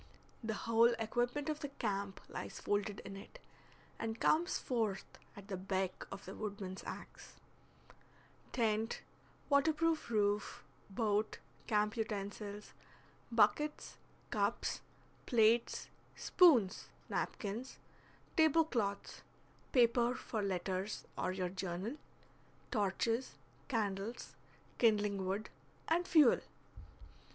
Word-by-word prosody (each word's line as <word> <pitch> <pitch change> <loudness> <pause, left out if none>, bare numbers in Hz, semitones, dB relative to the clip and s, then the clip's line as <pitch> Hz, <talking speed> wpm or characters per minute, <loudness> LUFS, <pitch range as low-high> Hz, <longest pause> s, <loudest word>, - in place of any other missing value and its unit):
The 220 -1 -1
whole 230 +2 +4
equipment 240 +6 -1
of 305 -1 -1
the 290 - -3
camp 200 -7 -3
lies - - -6
folded 205 0 -1
in 195 - -8
it, 195 - -11 0.6
and 225 0 -3
comes 340 +4 +3
forth 220 -6 -1 0.3
at 200 -1 -11
the 195 -3 -3
beck 190 0 -2
of 200 0 -7
the - - -7
woodman's 200 -3 -5
axe; - - -9 1.2
tent, 225 -1 0 0.4
waterproof 315 +1 +2
roof, 205 -2 +1 0.3
boat, 210 +1 0 0.3
camp 210 -1 +2
utensils, 205 -1 -4 0.6
buckets, 230 +7 +2 0.3
cups, - - 0 0.5
plates, 230 0 +3 0.3
spoons, 260 - +4 0.2
napkins, 225 +5 -3 0.6
table 320 -1 +5
cloths, 205 -9 -2 0.5
paper 240 0 +4
for 220 -3 -3
letters 190 +1 -2
or 185 - -1
your 185 -1 -2
journal, 190 +5 -3 0.8
torches, 225 +3 0 0.3
candles, 215 -2 -2 0.5
kindling 210 -4 +3
wood, 200 +3 -2 0.4
and 345 +2 +2
fuel. 300 -8 +6
215 Hz, 100 wpm, -36 LUFS, 200-245 Hz, 1.2 s, fuel